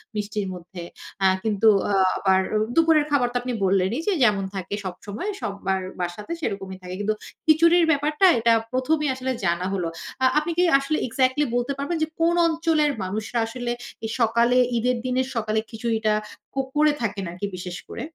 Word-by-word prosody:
মিষ্টির 210 -1 -2
মধ্যে। 175 0 -9 0.4
আ - - +6 0.2
কিন্তু 220 0 +2 0.2
আ - - +1 0.2
আবার 190 -1 +3 0.4
দুপুরের 320 -2 +4
খাবার 255 -4 +3
তো - - -23
আপনি 250 0 -3
বললেনই 195 - +1
যে 405 - +3
যেমন 205 -4 +3
থাকে 190 +1 -5
সবসময় 205 - -5
সবার 195 -1 -2 0.2
বাসাতে 180 - -4
সেরকমই 195 - -4
থাকে। 180 0 -7
কিন্তু 215 +1 0 0.3
খিচুড়ির 335 +2 +5
ব্যাপারটা 300 +5 +2
এটা 230 0 +4 0.2
প্রথমেই 290 +3 +1
আসলে 260 0 -3
জানা 170 +1 0
হলো। 180 -3 -1 0.4
আ - - +6
আপনি 310 +3 +1
কি 355 - +4 0.2
আসলে 290 +3 -1
এক্সাক্টলি 260 +4 +1
বলতে 245 +3 0
পারবেন 285 +5 -2
যে 315 - 0
কোন 340 +1 +3
অঞ্চলের 320 -2 +1
মানুষরা 210 +5 -3
আসলে 240 +1 -4 0.3
এই 220 - -3
সকালে 235 +2 +3 0.2
ঈদের 250 +1 +1
দিনের 255 +1 0
সকালে 220 -1 0
খিচুড়িটা 225 -2 0 0.4
কুক 270 -1 -1
করে 305 0 +5
থাকেন 200 -3 -2
আরকি 185 +3 -4
বিশেষ 180 0 -6
করে? - - -6
230 Hz, 170 wpm, -24 LUFS, 195-290 Hz, 0.4 s, আ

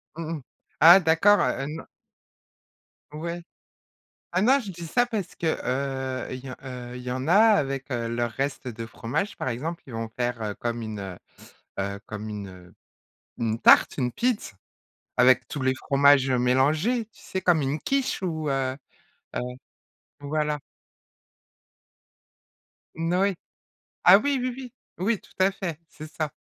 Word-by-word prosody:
Mmh 165 0 -4
mh. - - -10 0.4
Ah 170 +5 +10
d'accord, 175 +5 +4
heu, 135 - 0
non. 160 +2 -6 1.3
Ouais. 170 +3 -5 0.9
Ah 185 +2 +2
non, 265 +5 +5
je 205 - -7
dis 175 -2 -8
ça 245 +9 +2
parce, 215 -7 -3
heu, 160 - +1 0.8
il 130 - -5
y 135 - -6
en, - - -6
heu, 125 -1 -7
il 125 - -8
y 125 - -5
en 130 +4 -3
a - - +5
avec 195 -12 +4
leurs 120 -2 -2
restes 135 +2 -3
de 115 -1 -6
fromages, 120 - -3
par - - -3
exemple, 155 +8 -4
ils 130 - -11
vont 115 0 -4
faire 120 -4 -2
comme 120 0 -3
une, 100 -4 -6 0.6
heu 100 0 -3
comme 105 0 -6
une, 105 -2 -5
heu, 90 -1 -14 0.6
une 115 -1 -1
tarte, - - +6
une 125 -3 0
pizz, 240 - -1 0.6
avec 125 +1 +5
tous 145 - -5
les 130 0 +2
fromages, 140 0 +4
heu, 125 - +2
mélangés, 150 - +2
tu 210 -2 -23
sais, 190 -2 -4
comme 175 -3 +4
une 140 +3 -1
quiche 275 -6 -1
ou 160 -4 -2
heu, 135 -1 0 0.6
heu, - - +1 0.8
voilà. 150 +1 -1 2.4
N 165 +1 -2
oui. 200 +1 +2 0.7
Ah 185 +2 +9
oui, 280 +5 0
oui, 250 0 -2
oui. 255 -3 -8 0.3
Oui, 205 +3 0
tout - - -21
à 190 +1 +4
fait, 180 -5 -5
c'est 155 0 -11
ça. 155 -1 -3
145 Hz, 155 wpm, -26 LUFS, 125-185 Hz, 2.4 s, Ah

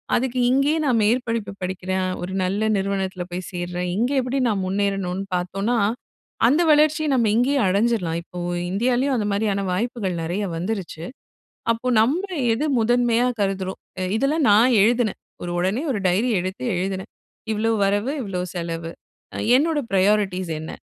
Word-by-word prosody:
அதுக்கு 255 0 0
இங்கேயே 275 +4 +2
நான் 250 -5 +3
மேற்படிப்பு 230 -2 0
படிக்கிறேன், 185 0 -2
ஒரு 180 +1 -4
நல்ல 195 +3 -1 0.2
நிறுவனத்துல 190 -2 -2
போய் 180 +1 -5
சேர்றேன். 180 0 -3
இங்கே 245 +6 +1
எப்படி 255 +2 -2
நான் 200 -3 -1
முன்னேறணும்னு 195 -1 -1
பாத்தோம்னா, 195 +6 -1 0.7
அந்த 290 +8 +3
வளர்ச்சியை 305 +1 +3
நம்ம 235 -3 +2
இங்கேயே 275 +4 +2
அடைஞ்சிறலாம். 195 -4 +1
இப்போ, 180 - -9 0.3
இந்தியாலயும் 250 +6 +1
அந்த 215 -4 0
மாரியான 200 -1 0
வாய்ப்புகள் 210 -3 -2
நெறையா 180 +5 -2
வந்துருச்சு. 180 -3 -4 0.7
அப்போ, 230 +2 -4
நம்ம 275 - +2 0.3
எத 245 - -2
முதன்மையா 240 +1 +2
கருதுறோம். 190 -1 -2 0.2
எ - - 0
இதெல்லாம் 280 +5 +1
நான் 230 +4 +5
எழுதுனேன். 230 0 +2 0.2
ஒரு 175 - -4
ஒடனே 190 +9 0
ஒரு 215 - -2
டயரி 200 +8 +2
எடுத்து 185 +6 -5
எழுதுனேன். 190 +1 -3 0.4
இவ்வளோ 220 +1 0
வரவு, 205 +7 +1
இவ்வளோ 190 -5 -3
செலவு. 165 -1 -4 0.5
அ - - -5 0.2
என்னோட 310 +3 +1
ப்ராயாரிட்டீஸ் 190 -2 +2
என்ன? 160 - -7
205 Hz, 145 wpm, -22 LUFS, 185-245 Hz, 0.7 s, நான்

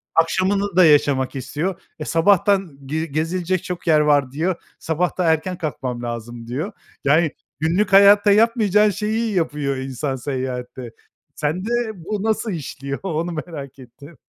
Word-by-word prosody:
akşamını 190 +4 +1
da 185 -2 +7
yaşamak 140 -3 +3
istiyor. 155 +8 -3 0.2
E, 155 - -4
"Sabahtan 195 -1 +2
ge 155 +4 -2
gezilecek 165 +4 -1
çok 180 -1 -6
yer 155 -2 +5
var." 145 -3 +3
diyor. 170 +6 -1 0.2
"Sabah 170 +3 -1
da 180 - +1
erken 175 +3 -3
kalkmam 130 -6 -4
lazım." 120 0 -6
diyor. 150 - -3 0.3
Yani 155 +2 +3 0.3
günlük 180 +6 +1
hayatta 200 +1 +7
yapmayacağın 210 -1 +4
şeyi 215 +2 -1
yapıyor 150 -6 -1
insan 135 +1 -3
seyahatte. 130 -2 -5 0.4
Sende 165 +8 -2 0.3
bu 195 +3 -4
nasıl 220 0 0
işliyor 140 -4 -5
onu 170 -2 -2
merak 155 -5 -7
ettim. 135 +5 -14
160 Hz, 140 wpm, -21 LUFS, 140-190 Hz, 0.4 s, da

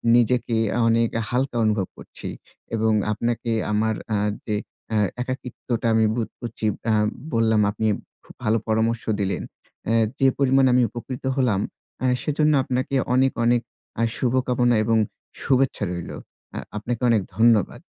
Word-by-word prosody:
নিজেকে 120 0 +2 0.3
অনেক 115 0 +3 0.2
হালকা 125 0 0
অনুভব 105 -3 +1
করছি। - - -9 0.5
এবং 110 0 +2 0.2
আপনাকে 115 +1 -1 0.2
আমার 110 +1 +1 0.2
আ - - +2 0.3
যে 105 - 0 0.4
অ্যা 110 - +1 0.2
একাকিত্বটা 125 -2 -3
আমি 110 0 +4
বোধ 115 -2 -2
করছি 115 -2 -5 0.3
আম 105 -1 +3 0.3
বললাম 110 -2 +3
আপনি 110 +1 -1 0.4
খুব - - -16
ভালো 110 0 +3
পরামর্শ 110 +1 +1 0.2
দিলেন। 100 -1 -1 0.4
অ্যা 115 - +1 0.2
যে 135 - +5
পরিমাণে 135 -1 +4
আমি 125 - +5
উপকৃত 120 +3 -7
হলাম 120 -7 +2 0.4
আ - - +2 0.2
সেজন্য 150 +1 +2
আপনাকে 130 +2 -1 0.2
অনেক, 130 +1 +4
অনেক 120 0 +3 0.4
আ - - +3
শুভকামনা 125 -1 +2
এবং 115 +1 +2 0.5
শুভেচ্ছা 135 -4 +2
রইলো। 85 -1 -5 0.4
আ - - -4 0.2
আপনাকে 115 +3 -3
অনেক 115 -3 +4 0.2
ধন্যবাদ। 115 -4 +3
115 Hz, 140 wpm, -23 LUFS, 110-125 Hz, 0.5 s, যে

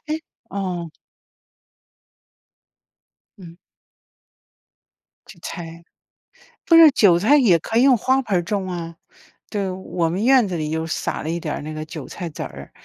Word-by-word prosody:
唉 305 - -2 0.4
嗯。 180 -4 -4 2.5
嗯。 170 -3 -13 1.7
韭 185 - -14
菜， 170 0 -8 0.8
不 330 - +5
是， 325 -2 +9
韭 200 -10 +4
菜 220 +11 +4
也 220 -12 +4
可 225 +8 -2
以 - - +5
用 265 -2 +5
花 260 +4 +1
盆 205 -7 0
儿 - - -1
种 190 +2 -3
啊。 170 -2 -6 0.5
对， 200 -3 -2
我 185 -2 -2
们 185 +5 -2
院 255 -2 +5
子 185 - -4
里 155 -2 -3
又 160 +1 -3
撒 - - -3
了 155 - -4
一 170 - -1
点 155 -3 -4
儿 - - -6
那 155 +1 -7
个 155 0 -5
韭 155 -3 -8
菜 175 - -6
籽 150 - -9
儿， 70 -1 -8
175 Hz, 170 characters per minute, -21 LUFS, 165-215 Hz, 2.5 s, 是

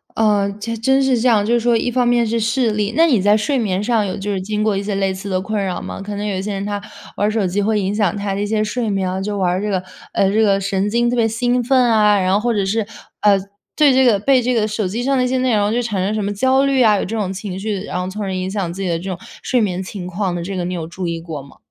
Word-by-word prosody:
呃， 210 -2 +2
这 230 +2 -3
真 265 +4 +2
是 265 -3 +2
这 245 - +2
样， 220 -4 +4
就 230 +3 +1
是 - - +3
说 235 0 +2
一 230 - 0
方 245 0 +1
面 240 -1 +3
是 230 +1 0
视 230 +2 +1
力 210 0 -1
那 330 +3 +5
你 255 -9 +3
在 205 +2 +4
睡 220 +6 0
眠 200 -5 -1
上 225 -2 +1
有 190 - -3
就 205 +1 -4
是 195 - -1
经 210 +3 -3
过 215 -2 +1
一 195 - -2
些 205 0 -3
类 195 -1 0
似 190 +2 -7
的 185 -1 -1
困 210 +1 -2
扰 185 -2 -3
吗？ - - -6
可 205 +1 -5
能 205 - -4
有 200 -3 -2
些 200 +2 -3
人 195 0 -3
他 205 0 -2 0.4
玩 205 - +2
儿 215 - +1
手 210 -4 0
机 200 +3 -1
会 215 +1 +1
影 195 +2 -1
响 205 -4 +1
他 200 -1 -2
的 - - -3
一 - - 0
些 215 +1 0
睡 220 +1 -2
眠 195 -2 -1
啊， 190 - -3
就 205 +1 -3
玩 185 -2 +2
儿 185 - -1
这 210 - -2
个， 185 -2 -1 0.3
呃， 195 0 +2
这 215 - +1
个 195 -2 +2
神 195 +1 0
经 235 +2 +1
特 245 - 0
别 230 -2 +2
兴 245 +2 0
奋 260 +2 +3
啊， 210 -2 +4
然 185 0 +1
后 200 - +3
或 240 +2 0
者 205 -2 0
是， 210 +3 0 0.4
呃， 205 -2 +5 0.4
对 295 -3 +5
这 260 0 +4
个 220 -5 +4
被 265 +5 +3
这 250 +1 0
个 220 -3 +1
手 215 -2 -2
机 220 +6 -3
上 270 +2 +1
的 255 - +2
一 - - +1
些 260 +1 0
内 255 -3 +2
容 205 +1 +1
就 245 - +1
产 205 -6 -2
生 205 - -1
什 215 -1 -1
么 200 - -1
焦 260 +6 +2
虑 275 -2 +3
啊， 215 -2 +5
有 - - -1
这 225 +4 -4
种 195 -3 -2
情 190 -1 -6
绪， 200 -1 -3
然 180 - -4
后 180 - -3
从 200 +3 -6
而 195 -2 -2
影 185 0 -3
响 195 -4 -2
自 195 +3 -5
己 185 - -1
的 165 -1 -1
这 190 +3 -6
种 185 - -3 0.2
睡 255 - +1
眠 185 -3 -1
情 190 -1 -7
况 180 0 -2
的 170 - -3
这 195 +3 -5
个， 180 - -2
你 180 +1 -3
有 165 -2 -4
注 175 +2 -5
意 170 0 -3
过 165 -3 -7
吗？ 140 0 -16
210 Hz, 350 characters per minute, -19 LUFS, 195-230 Hz, 0.4 s, 那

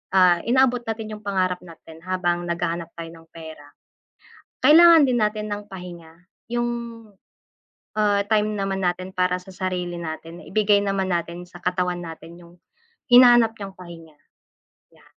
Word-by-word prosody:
ah, 180 -2 +5
inaabot 250 0 +3
natin 220 -1 -5
yung 215 - -7
pangarap 185 -2 0
natin, 165 -2 -14
habang 175 -2 -1
naghahanap 170 0 -3
tayo 165 -1 -8
ng 165 0 -16
pera, 160 -3 -11 0.9
kailangan 320 +1 +7
din 250 - +1
natin 210 0 -3
ng 205 0 -5
pahinga. 175 -3 -10 0.4
Yung, 240 0 0 1.3
ah, 205 -1 +2
time 215 0 +1
naman 195 -2 -2
natin 180 +1 -2
para 180 0 0
sa 185 - -16
sarili 180 -2 -4
natin 165 0 -8
ibigay 210 -1 +2
naman 195 -1 -1
natin 175 0 -4
sa 175 - -12
katawan 180 -1 -1
natin 165 +1 -11
yung, 170 -1 -16 0.6
hinahanap 240 -2 +7
niyang 195 -2 -8
pahinga. 165 -3 -13 0.7
Ya - - -24
185 Hz, 140 wpm, -23 LUFS, 170-210 Hz, 1.3 s, kailangan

